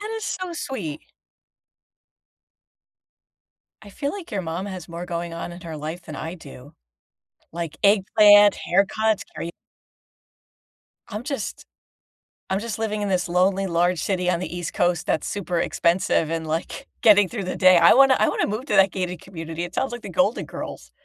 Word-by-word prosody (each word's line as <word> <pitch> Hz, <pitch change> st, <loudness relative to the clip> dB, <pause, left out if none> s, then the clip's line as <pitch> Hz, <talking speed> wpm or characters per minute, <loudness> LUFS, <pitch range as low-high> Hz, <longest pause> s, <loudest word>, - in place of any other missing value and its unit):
That 425 Hz, +1 st, -5 dB
is 440 Hz, -, -5 dB
so 370 Hz, -3 st, -4 dB
sweet. 225 Hz, -, -5 dB, 2.8 s
I 205 Hz, -, -12 dB
feel 280 Hz, +8 st, -3 dB
like 395 Hz, -4 st, -8 dB
your 195 Hz, -3 st, -1 dB
mom 170 Hz, +4 st, -4 dB
has 185 Hz, -4 st, -7 dB
more 170 Hz, +1 st, -6 dB
going 170 Hz, -1 st, -4 dB
on 170 Hz, +1 st, -6 dB
in 175 Hz, -, -10 dB
her 165 Hz, -3 st, -7 dB
life 155 Hz, +4 st, -6 dB
than -, -, -9 dB
I 165 Hz, +2 st, -5 dB
do- 145 Hz, -4 st, -13 dB, 0.8 s
like 165 Hz, -2 st, -5 dB
eggplant, 205 Hz, 0 st, +6 dB
haircuts, 200 Hz, +3 st, +2 dB
kara 170 Hz, -, -5 dB, 1.6 s
I'm 210 Hz, 0 st, -6 dB
just 275 Hz, +1 st, -5 dB, 0.9 s
I'm 190 Hz, +1 st, 0 dB
just 225 Hz, -1 st, -5 dB
living 215 Hz, -1 st, -2 dB
in 205 Hz, -, -1 dB
this 180 Hz, -2 st, 0 dB
lonely, 185 Hz, +2 st, +2 dB
large 175 Hz, -1 st, +1 dB
city 180 Hz, +1 st, -1 dB
on 170 Hz, -, +1 dB
the 175 Hz, -1 st, -5 dB
East 175 Hz, -, -5 dB
Coast 175 Hz, -2 st, +1 dB
that's 155 Hz, -, 0 dB
super 180 Hz, -4 st, -2 dB
expensive 170 Hz, -2 st, +1 dB
and, 165 Hz, -1 st, -3 dB
like, 160 Hz, +2 st, -4 dB, 0.2 s
getting 205 Hz, -3 st, +6 dB
through 205 Hz, -6 st, -4 dB
the 185 Hz, -, -3 dB
day. 185 Hz, -2 st, +6 dB
I 170 Hz, 0 st, +7 dB
wanna 270 Hz, 0 st, +6 dB
I 215 Hz, -, +3 dB
wanna -, -, 0 dB
move 215 Hz, +6 st, -4 dB
to -, -, +1 dB
that 195 Hz, -1 st, +5 dB
gated 180 Hz, -2 st, -4 dB
community. 165 Hz, -2 st, -6 dB
It 175 Hz, -, -6 dB
sounds 270 Hz, -, -1 dB
like 240 Hz, -, -6 dB
The -, -, -7 dB
Golden 275 Hz, -, +1 dB
Girls. -, -, -8 dB
185 Hz, 175 wpm, -23 LUFS, 170-210 Hz, 2.8 s, I